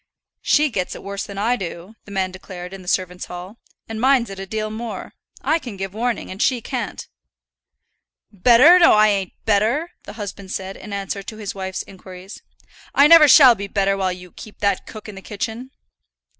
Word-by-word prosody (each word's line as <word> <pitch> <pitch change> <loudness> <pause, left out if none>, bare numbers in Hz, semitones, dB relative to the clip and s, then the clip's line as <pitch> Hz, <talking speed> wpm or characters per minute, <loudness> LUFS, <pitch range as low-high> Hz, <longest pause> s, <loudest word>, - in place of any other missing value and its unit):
"She 300 -1 +2
gets 185 -5 -3
it - - -10
worse 200 0 -5
than 200 -1 -9
I 225 +5 +1
do," 180 -1 -7
the 205 - -12
man 190 -1 -1
declared 185 -1 -9
in 195 - -9
the 180 - -15
servants' 180 -1 -1
hall; 180 +5 -9 0.3
"and 225 0 -5
minds 255 -4 +3
it 195 - -8
a 195 - -6
deal 215 +1 -3
more. 225 +1 -6 0.3
I 320 - +2
can 240 -9 -8
give 195 0 -5
warning, 235 0 -2
and 190 +3 -6
she 255 -2 +2
can't." - - -5 1.2
"Better? 245 - +6
No, 340 - +7
I 215 0 +5
ain't 195 -3 -1
better," 225 +11 +1
the - - -9
husband 200 -3 -7
said, 190 0 -5
in 210 - -11
answer 200 0 -4
to 215 +2 -9
his 210 -3 -5
wife's 190 -1 -5
inquiries. 185 0 -12 0.5
"I 280 - +7
never 320 0 +9
shall 265 -2 +9
be 200 -2 -6
better 195 -1 +1
while 190 -1 -1
you 180 -1 -9
keep 210 -2 -12
that 200 -1 -1
cook 215 -1 -10
in 210 - -8
the 195 - -10
kitchen." 220 +5 -5
200 Hz, 200 wpm, -21 LUFS, 190-230 Hz, 1.2 s, never